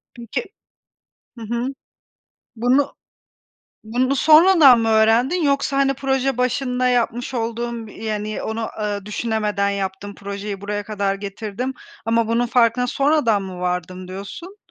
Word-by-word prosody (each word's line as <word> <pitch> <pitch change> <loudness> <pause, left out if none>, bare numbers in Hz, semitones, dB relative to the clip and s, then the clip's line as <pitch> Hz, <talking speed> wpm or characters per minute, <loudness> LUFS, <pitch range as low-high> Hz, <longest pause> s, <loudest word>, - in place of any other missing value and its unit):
Peki 235 - -4 1.0
Hı - - -8
hı. 235 +1 -1 0.9
Bunu 255 +5 +2 0.9
bunu 255 +5 0
sonradan 310 -4 +7
mı 225 - 0
öğrendin? 225 +10 +3
Yoksa, 280 -1 +1
hani, 275 0 +3
proje 270 -1 0
başında 250 0 0
yapmış 245 +1 0
olduğun, 235 0 -3
yani 215 0 -4
onu, 225 0 -3
ııı, 205 -1 -3
düşünemeden 210 -2 -1
yaptım, 200 0 -4
projeyi 200 0 -6
buraya 205 +1 -3
kadar 200 -2 -1
getirdim 210 +5 -5 0.3
ama 230 0 +2
bunun 235 +1 +1
farkına 240 0 +3
sonradan 275 -6 +2
mı 185 -2 -7
vardım, 180 0 -3
diyorsun? 265 - -8
230 Hz, 120 wpm, -21 LUFS, 205-255 Hz, 1.0 s, sonradan